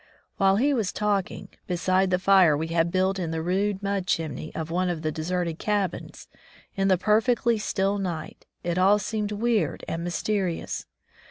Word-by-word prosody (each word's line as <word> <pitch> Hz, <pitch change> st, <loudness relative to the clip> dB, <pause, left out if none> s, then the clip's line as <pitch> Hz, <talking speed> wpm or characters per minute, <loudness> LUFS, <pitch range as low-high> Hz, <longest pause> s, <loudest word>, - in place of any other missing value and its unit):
While 195 Hz, -1 st, +4 dB
he 275 Hz, +7 st, +2 dB
was 220 Hz, -8 st, 0 dB
talking, 205 Hz, -3 st, -2 dB, 0.2 s
beside 185 Hz, +2 st, +1 dB
the 180 Hz, -, +2 dB
fire 185 Hz, -5 st, +5 dB
we 160 Hz, +2 st, -3 dB
had 165 Hz, 0 st, +1 dB
built 190 Hz, +1 st, +1 dB
in 170 Hz, -3 st, -2 dB
the 160 Hz, 0 st, -3 dB
rude 195 Hz, +3 st, 0 dB
mud 200 Hz, -2 st, -1 dB
chimney 155 Hz, -3 st, -2 dB
of 160 Hz, 0 st, -4 dB
one 180 Hz, +1 st, 0 dB
of 170 Hz, -2 st, -3 dB
the 155 Hz, -, 0 dB
deserted 170 Hz, +1 st, -2 dB
cabins, 205 Hz, -4 st, -2 dB, 0.5 s
in 195 Hz, -1 st, +1 dB
the 190 Hz, -1 st, +4 dB
perfectly 225 Hz, +3 st, +2 dB
still 200 Hz, 0 st, 0 dB
night, 175 Hz, -5 st, -5 dB, 0.2 s
it 175 Hz, +1 st, -1 dB
all 195 Hz, +3 st, +5 dB
seemed 210 Hz, +1 st, -3 dB
weird 220 Hz, +1 st, 0 dB
and 165 Hz, +1 st, -3 dB
mysterious. 180 Hz, 0 st, -2 dB
190 Hz, 170 wpm, -26 LUFS, 170-205 Hz, 0.5 s, fire